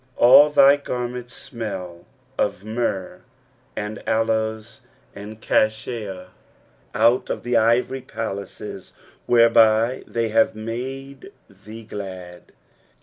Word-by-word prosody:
8 - - -10
All 135 +5 +8
thy 140 -1 +6
garments 125 -2 -5
smell 95 -8 -7 0.3
of 95 - -2
myrrh, 105 -5 -3 0.5
and 105 0 -5
aloes, 110 0 -1 0.3
and 105 +2 -10
cassia, 110 -4 -1 0.7
out 120 +2 +3
of - - -4
the 120 0 -1
ivory 120 +4 +2
palaces, 100 -3 -7 0.3
whereby 115 0 +4
they 115 -1 -2
have 110 0 +2
made 135 - -7 0.2
thee 105 +3 -13
glad. 95 -4 -9
110 Hz, 100 wpm, -22 LUFS, 105-120 Hz, 0.7 s, All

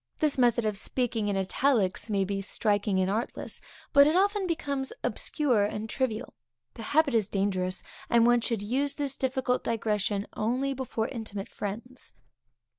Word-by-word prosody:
This 305 -2 +2
method 240 -3 +3
of 210 -2 -1
speaking 235 -3 0
in 200 -1 0
italics 205 0 +1
may 200 -2 +2
be 195 +1 -2
striking 205 0 +1
and 185 - +2
artless; 215 +5 -3 0.3
but 280 -1 +8
it 310 - +2
often 400 +1 +2
becomes 280 -5 -2
obscure 255 -9 +1
and 210 +1 -2
trivial; 250 0 -2 0.4
the - - -9
habit 285 +4 +2
is 215 -3 +2
dangerous, 185 -2 0 0.3
and 235 -1 +5
one 240 0 +5
should 225 -3 -1
use 270 +6 0
this 280 -2 -2
difficult 260 -1 0
digression 210 -3 0
only 255 +5 0
before 245 -4 -2
intimate 215 -5 -5
friends. 230 +6 -6
230 Hz, 155 wpm, -28 LUFS, 205-265 Hz, 0.4 s, but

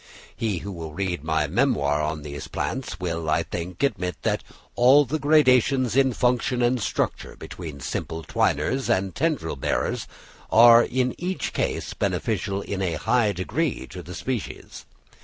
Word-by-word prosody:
He 110 -5 -1
who 100 +5 -6
will 80 -4 -7
read 90 -4 -2
my 80 -1 +1
memoir 75 - +1
on 75 0 -3
these 70 -2 -7
plants 125 -8 -4
will, 85 -3 -3
I 80 +2 +2
think, 85 - -5
admit 95 -9 0
that - - 0 0.3
all 135 +4 +6
the 155 +5 -2
many 150 +2 +5
gradations 130 -2 +3
in 135 -1 +4
function 125 0 +1
and 120 0 +2
structure - - -2
between 80 -6 -8
simple 80 +5 -4
twiners 115 - 0
and 95 0 +1
tendril 140 - -1
bearers - - -1 0.4
are 115 +1 +8
in 125 +1 0
each 180 +2 -3
case - - -2
beneficial 100 0 -1
in 100 -1 -4
a 90 -4 0
high 115 +6 +2
degree 125 - -2
to 90 -1 -7
the 90 +1 -9
species. 125 +4 -5
100 Hz, 160 wpm, -24 LUFS, 80-130 Hz, 0.4 s, are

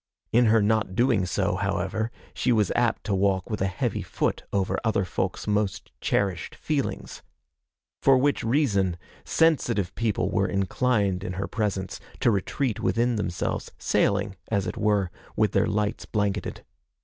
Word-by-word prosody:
In 120 +2 +5
her 110 -1 +5
not 105 -3 +1
doing 115 -6 +3
so, - - 0
however, 110 +5 -1 0.2
she 125 - +1
was 105 -5 +3
apt 120 -1 +1
to 105 - -1
walk 95 +1 +1
with 105 - -2
a 95 - +2
heavy 95 - -2
foot - - -1
over 95 -2 0
other 110 -4 +1
folks' 90 +1 -2
most 105 -2 -1
cherished 95 -5 0
feelings. 150 -3 -3 0.8
For 135 -1 +6
which 140 +2 +1
reason, 105 - +2 0.3
sensitive 120 - +2
people 105 -4 0
were 100 -1 +2
inclined 100 -1 +1
in 105 - -4
her 95 +1 -3
presence 100 -4 -2 0.2
to 120 - +4
retreat 110 +4 -1
within 120 +1 +1
themselves, 95 -5 -2
sailing, 100 -1 +1
as 100 -3 0
it - - -3
were, 105 -4 +1 0.2
with - - +2
their - - +2
lights 105 0 -1
blanketed. 100 -3 -2
105 Hz, 150 wpm, -26 LUFS, 95-115 Hz, 0.8 s, For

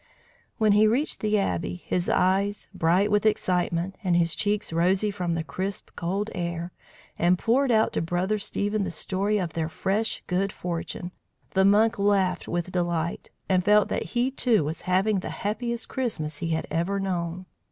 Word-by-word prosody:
When 215 -1 +3
he 210 +1 +5
reached 260 +8 0
the 215 0 +1
Abbey, 185 -3 -1
his 180 0 -2
eyes 195 +3 +1
bright 185 +4 +2
with 210 -1 +3
excitement, 180 -3 0
and 180 -3 +2
his 165 -2 +2
cheeks 205 -3 -1
rosy 185 +5 +2
from 180 -4 -2
the 165 - -2
crisp 185 +7 -5
cold 195 +5 -2
air, 170 -1 -3 0.5
and 175 +2 +4
poured 255 +7 +2
out 220 -2 +3
to - - 0
Brother 180 +5 0
Stephen 205 0 -1
the 185 - -2
story 195 +5 -1
of 175 -5 -2
their 160 -1 -2
fresh 200 +6 -1
good 190 +2 0
fortune, 175 0 -5 0.4
the 190 0 +3
monk 215 +3 +4
laughed 195 -3 +2
with 175 +1 -2
delight, 170 -2 -2 0.2
and 185 -1 +2
felt 210 +2 +4
that - - -1 0.2
he, 250 +2 +2
too, 240 - +2
was 155 +3 -4
having 195 +2 +2
the - - -5
happiest 235 +3 -3
Christmas 155 - -3
he 170 - -2
had 160 -1 -1
ever 170 +5 0
known. 180 -2 -3
190 Hz, 175 wpm, -26 LUFS, 175-210 Hz, 0.5 s, he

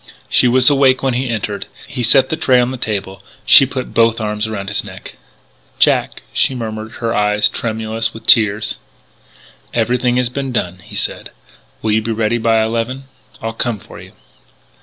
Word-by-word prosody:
She - - +3
was 125 +1 +3
awake 135 -2 +4
when 135 -2 +1
he 125 +1 -2
entered. 110 -3 -3 0.2
He 125 - -5
set 130 +5 +4
the 160 - 0
tray 130 -5 +3
on 125 +1 +1
the 130 - -5
table. 100 -5 -4 0.2
She 135 - +8
put 130 -1 -5
both 115 0 +3
arms 105 0 -2
around 100 -3 -5
his 100 -2 -1
neck. - - -10 0.6
"Jack," - - +2
she 130 - +1
murmured, 110 -1 -6
her 115 -1 -3
eyes 105 -1 +2
tremulous 110 0 -3
with 115 - -12
tears. 110 -1 +3 1.0
"Everything 125 +1 +1
has 125 -1 +1
been 135 +1 -4
done," 90 -6 -2
he 90 - -13
said. - - -3 0.5
"Will 110 - +1
you 110 +1 +2
be 115 +1 -3
ready 115 +1 0
by 115 -1 +2
eleven? 115 +4 -2 0.4
I'll 115 0 -3
come 115 -1 -2
for - - -13
you." - - -14
115 Hz, 180 wpm, -17 LUFS, 110-125 Hz, 1.0 s, She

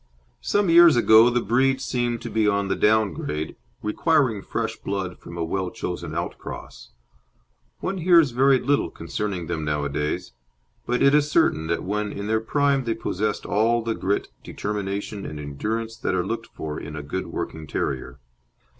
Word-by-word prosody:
Some 205 -1 +1
years 170 -2 +8
ago 115 0 +7
the 120 -1 0
breed 130 +5 +2
seemed 120 -3 -2
to - - -5
be 110 -1 +2
on 100 -1 +1
the - - +1
down 110 -1 +3
grade, 75 +1 -4 0.3
requiring 115 -1 +2
fresh 115 +1 -3
blood 95 -2 -4
from 85 - -10
a 85 - -1
well 95 +3 -2
chosen 90 0 -5
outcross. - - -6 0.9
One 195 - -2
hears 170 -5 +5
very 135 +2 +4
little 140 +3 +1
concerning 90 +1 -4
them 80 -2 -3
nowadays, 75 -2 -2 0.5
but 125 +1 +1
it 140 - +5
is 150 0 +3
certain 80 - +2
that 85 0 -1
when 105 +1 -2
in 100 - -5
their 110 +1 +1
prime 140 +2 +1
they 115 -1 0
possessed 105 -1 -2
all 115 +3 +2
the 115 0 -1
grit, 100 -1 -1
determination, 100 0 -4
and 75 - -6
endurance 110 +11 -3
that - - -1
are 90 - 0
looked 115 0 -4
for 75 -1 -6
in 75 - -7
a 75 - -5
good 95 +6 -4
working 80 -1 -5
terrier. 70 -1 -3
105 Hz, 170 wpm, -24 LUFS, 90-120 Hz, 0.9 s, years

